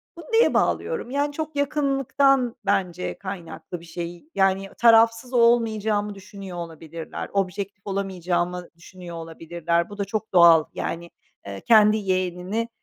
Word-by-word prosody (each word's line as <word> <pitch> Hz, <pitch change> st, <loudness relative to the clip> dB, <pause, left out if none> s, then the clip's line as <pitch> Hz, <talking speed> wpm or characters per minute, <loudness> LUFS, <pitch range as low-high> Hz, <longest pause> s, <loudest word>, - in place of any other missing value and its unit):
Bunu 340 Hz, -, -11 dB
neye 455 Hz, +1 st, +5 dB
bağlıyorum? 465 Hz, -, 0 dB
Yani, 285 Hz, +1 st, 0 dB
çok 310 Hz, 0 st, -5 dB
yakınlıktan 275 Hz, -3 st, +1 dB
bence 185 Hz, -3 st, -1 dB
kaynaklı 185 Hz, -2 st, -7 dB
bir 170 Hz, -, -14 dB
şey. 175 Hz, -, -7 dB
Yani, 195 Hz, 0 st, +2 dB
tarafsız 230 Hz, +1 st, +4 dB
olmayacağımı 220 Hz, -3 st, +2 dB
düşünüyor 195 Hz, -2 st, -9 dB
olabilirler. 165 Hz, -1 st, -7 dB
Objektif 195 Hz, +1 st, -2 dB
olamayacağımı 180 Hz, -2 st, -2 dB
düşünüyor 175 Hz, 0 st, -11 dB
olabilirler. 170 Hz, +1 st, -2 dB
Bu 205 Hz, -, -10 dB
da 200 Hz, -, -2 dB
çok 215 Hz, +2 st, -4 dB
doğal, 170 Hz, -3 st, +7 dB
yani, 170 Hz, +1 st, -4 dB, 0.4 s
eee, 100 Hz, -1 st, -7 dB
kendi 215 Hz, -1 st, +5 dB
yeğenini, 185 Hz, +3 st, -2 dB
195 Hz, 125 wpm, -24 LUFS, 175-230 Hz, 0.4 s, doğal